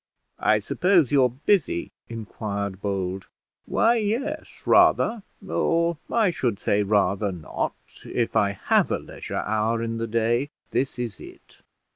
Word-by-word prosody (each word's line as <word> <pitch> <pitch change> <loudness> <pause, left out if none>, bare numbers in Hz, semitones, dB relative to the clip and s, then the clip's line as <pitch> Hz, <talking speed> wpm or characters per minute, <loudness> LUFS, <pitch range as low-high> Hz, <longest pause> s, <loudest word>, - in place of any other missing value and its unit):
"I 110 - +4
suppose 170 - +2
you're 135 -3 +5
busy?" 135 - 0 0.2
inquired 100 -3 -5
Bold. 95 -2 -3 0.4
"Why, 235 +1 +3
yes, 225 +6 -2 0.2
rather; 225 0 +4 0.3
or 170 -2 +1
I 220 -5 +3
should 120 -10 -1
say 100 +1 +1
rather 100 0 +1
not. 85 -4 -3 0.3
If 120 -2 -2
I 100 -1 +3
have 100 - +2
a - - +2
leisure - - -6
hour 110 +2 0
in 115 0 -3
the 115 - -2
day, 115 +4 +1 0.2
this 135 -1 -1
is 120 -4 -4
it." - - -14
115 Hz, 135 wpm, -25 LUFS, 100-160 Hz, 0.4 s, you're